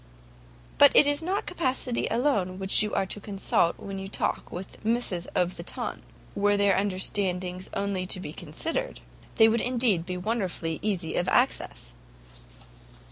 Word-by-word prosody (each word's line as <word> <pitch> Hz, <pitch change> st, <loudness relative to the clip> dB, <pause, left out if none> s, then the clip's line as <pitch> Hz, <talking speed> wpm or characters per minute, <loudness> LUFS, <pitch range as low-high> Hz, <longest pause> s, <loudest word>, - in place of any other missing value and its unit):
"But -, -, +8 dB
it -, -, +8 dB
is 290 Hz, +1 st, +1 dB
not 375 Hz, +5 st, -2 dB
capacity 260 Hz, -7 st, -1 dB
alone 205 Hz, -8 st, 0 dB
you 210 Hz, 0 st, +5 dB
are -, -, +1 dB
to 200 Hz, -, -4 dB
consult 195 Hz, -4 st, 0 dB
when 195 Hz, -1 st, -6 dB
you 195 Hz, -, -6 dB
talk 195 Hz, -, -2 dB
with 180 Hz, +2 st, -8 dB
misses 215 Hz, -6 st, -1 dB
of 180 Hz, 0 st, 0 dB
the -, -, -6 dB
TON; -, -, -4 dB, 0.3 s
were 205 Hz, 0 st, +2 dB
their 200 Hz, -1 st, +3 dB
understandings 185 Hz, -2 st, -1 dB
only 195 Hz, -2 st, -2 dB
to 185 Hz, -, -1 dB
be 150 Hz, -4 st, -7 dB
considered, 320 Hz, -, -4 dB, 0.4 s
they 220 Hz, -, +7 dB
would 225 Hz, 0 st, +2 dB
indeed 235 Hz, -8 st, +2 dB
be 180 Hz, -1 st, -3 dB
wonderfully 180 Hz, -5 st, -2 dB
easy 190 Hz, -6 st, -2 dB
of 175 Hz, -, 0 dB
access! -, -, 0 dB
200 Hz, 150 wpm, -27 LUFS, 180-230 Hz, 0.4 s, But